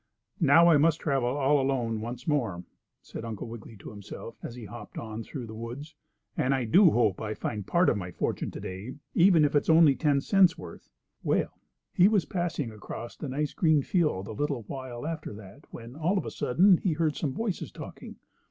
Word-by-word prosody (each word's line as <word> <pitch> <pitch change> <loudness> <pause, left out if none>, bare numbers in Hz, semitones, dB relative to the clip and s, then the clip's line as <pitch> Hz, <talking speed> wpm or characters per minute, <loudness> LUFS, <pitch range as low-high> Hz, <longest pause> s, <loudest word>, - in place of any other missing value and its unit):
"Now 165 +2 +6
I 165 -3 +6
must 155 +2 +3
travel 135 -5 0
all 140 +1 +2
alone 120 -5 -1
once 120 +2 -7
more," 115 - 0 0.4
said - - -8
Uncle 115 -2 -5
Wiggily 115 -1 -10
to - - -10
himself, 105 +2 -9
as 120 - -7
he 120 -3 -9
hopped 120 +3 -10
on 110 0 -5
through 130 +1 -7
the 110 - -9
woods. 120 +8 -7 0.4
"And 135 +2 +1
I 130 -2 -1
do 180 - +6
hope 110 -8 +1
I 110 -1 -3
find 105 -2 -4
part 175 +1 +3
of - - +3
my 90 -2 -5
fortune 90 - -2
to - - -8
day, 95 +7 -7 0.2
even 170 -3 +5
if 145 - 0
it's 145 - +2
only 160 -3 +7
ten 145 -2 +2
cents' 185 +3 +4
worth." 85 -2 -11 0.3
Well, - - -1 0.3
he 180 - +6
was 205 -4 +2
passing 165 -9 -2
across 110 +2 -8
a 150 - -5
nice 145 +3 -2
green 155 -5 +3
field 150 - 0
a - - -6
little 140 +1 -2
while 130 +1 -7
after 160 -7 -5
that 105 +7 -13
when, 120 +2 -10
all 165 +6 0
of - - -2
a - - -5
sudden, 180 +8 +4
he 180 -1 0
heard 155 -1 0
some 140 -5 -2
voices 220 -5 -3
talking. - - -10
135 Hz, 205 wpm, -28 LUFS, 115-160 Hz, 0.4 s, only